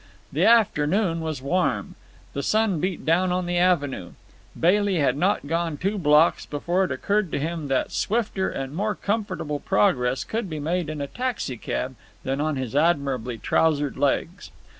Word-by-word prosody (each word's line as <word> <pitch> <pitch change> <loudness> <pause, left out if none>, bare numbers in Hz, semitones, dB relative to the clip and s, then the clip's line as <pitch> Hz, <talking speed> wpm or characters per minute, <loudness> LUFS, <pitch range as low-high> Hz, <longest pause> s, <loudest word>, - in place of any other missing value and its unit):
The - - +2
afternoon 190 -5 +3
was 155 -5 -4
warm. 140 - 0 0.4
The 140 - -2
sun 215 -1 +1
beat 185 +2 -3
down 180 +3 +2
on 180 0 0
the 175 0 0
avenue. 145 - +1 0.5
Bailey 200 +3 +3
had 140 -6 +2
not 180 +2 +1
gone 165 0 -1
two 195 +6 -1
blocks 150 0 +4
before 175 +6 0
it 155 - -5
occurred 200 +8 0
to - - 0
him 160 0 -3
that 135 -1 0
swifter 210 -3 0
and 135 0 -5
more 210 +5 -1
comfortable 195 -8 -2
progress 125 +2 +1
could 220 -3 -3
be 155 -2 -4
made 165 +2 -1
in 155 -2 -4
a 140 - -3
taxicab 135 - -3 0.3
than 135 +2 -1
on 155 0 0
his 130 -1 -4
admirably 140 -7 +1
trousered 145 +3 +1
legs. 145 +6 -1
160 Hz, 160 wpm, -24 LUFS, 140-185 Hz, 0.5 s, blocks